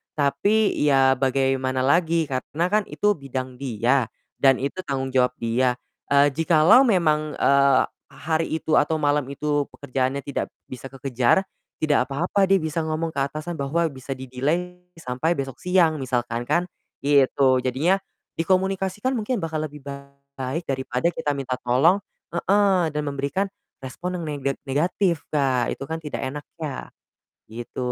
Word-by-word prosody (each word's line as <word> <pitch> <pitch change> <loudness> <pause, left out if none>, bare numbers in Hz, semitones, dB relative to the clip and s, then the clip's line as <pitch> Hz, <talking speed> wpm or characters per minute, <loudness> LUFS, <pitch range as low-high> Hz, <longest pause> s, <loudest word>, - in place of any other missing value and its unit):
Tapi 200 +10 +2
ya, 135 -2 +4
bagaimana 130 -1 +1
lagi 165 +3 +3
karena 150 +6 -2
kan 210 0 +3
itu 210 - +1
bidang 130 -3 -6
dia, 125 -1 +1 0.3
dan 135 -1 +5
itu 140 +7 -3
tanggung 135 -1 -2
jawab 125 -1 +2
dia. 120 +2 +1 0.4
Eee, 140 0 +5
jikalau 165 - +5
memang, 155 -7 +2
eee, 140 -1 +4 0.2
hari 160 +4 -2
itu 155 - +1
atau 160 +2 +1
malam 145 -1 +2
itu 145 +1 -1
pekerjaannya 135 0 -2
tidak 140 0 -3 0.2
bisa 130 +1 -7
kekejar, 130 +4 +1 0.4
tidak 145 -4 +2
apa-apa 175 +8 +1
dia 195 - +5
bisa 160 +1 -2
ngomong 160 +1 -2
ke 140 - -4
atasan 155 +3 -6
bahwa 145 +5 0
bisa 135 0 -6
di 130 - -9
delay 170 +8 -1 0.2
sampai 160 +2 -1
besok 135 -3 -5
siang 175 -4 +2
misalkan 120 -2 -2
kan, 175 - +2 0.4
gitu. 135 -2 +4
Jadinya 140 +10 +1 0.4
dikomunikasikan 190 +5 0
mungkin 225 -1 -2
bakal 160 -1 -2
lebih 150 -1 -13 0.6
baik 135 +6 -2
daripada 130 +4 0
kita 145 -3 -2
minta 130 -2 -3
tolong 135 +11 +3 0.3
heeh, 190 0 +2
dan 150 0 -1
memberikan 140 +7 -1 0.4
respon 175 +8 -5
neng 175 - -4
nega 145 -3 -2
negatif 165 +4 0
Kak, 130 -5 +1
itu - - -8
kan 160 +3 -4
tidak 150 -2 -5
enak 140 +3 -5 0.2
ya. 145 -4 -4 0.6
Gitu. 115 +1 -9
145 Hz, 145 wpm, -24 LUFS, 130-165 Hz, 0.6 s, dan